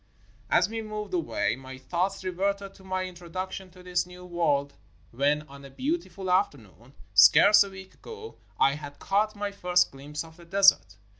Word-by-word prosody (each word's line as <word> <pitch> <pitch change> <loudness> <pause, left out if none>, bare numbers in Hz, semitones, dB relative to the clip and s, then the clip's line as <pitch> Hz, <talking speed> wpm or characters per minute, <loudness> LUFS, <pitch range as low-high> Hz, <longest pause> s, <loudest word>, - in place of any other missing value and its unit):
As 180 - +4
we 225 +1 -4
moved 210 -2 -6
away, 115 - 0
my 130 0 -10
thoughts 180 +8 -2
reverted 195 +2 -2
to 190 - -18
my 185 0 -2
in 185 0 -6
troduction 185 +2 -6
to 180 -1 -15
this 180 -1 -1
new 180 0 -12
world, 145 -5 0 0.4
when 145 +4 +1
on 140 -1 -14
a 140 - -10
beautiful 220 - -3
after 185 -5 +2
noon, 115 +4 -19 0.2
scarce 105 - +8
a 200 - -8
week 190 0 -12
ago, 445 0 -11 0.2
I 135 - +4
had 145 -1 -8
caught 210 +2 0
my 205 0 -3
first 180 -2 +2
gUmpse 145 +3 -7
of 160 0 -15
the 170 - -15
desert. 180 - +4
180 Hz, 180 wpm, -27 LUFS, 145-195 Hz, 0.4 s, scarce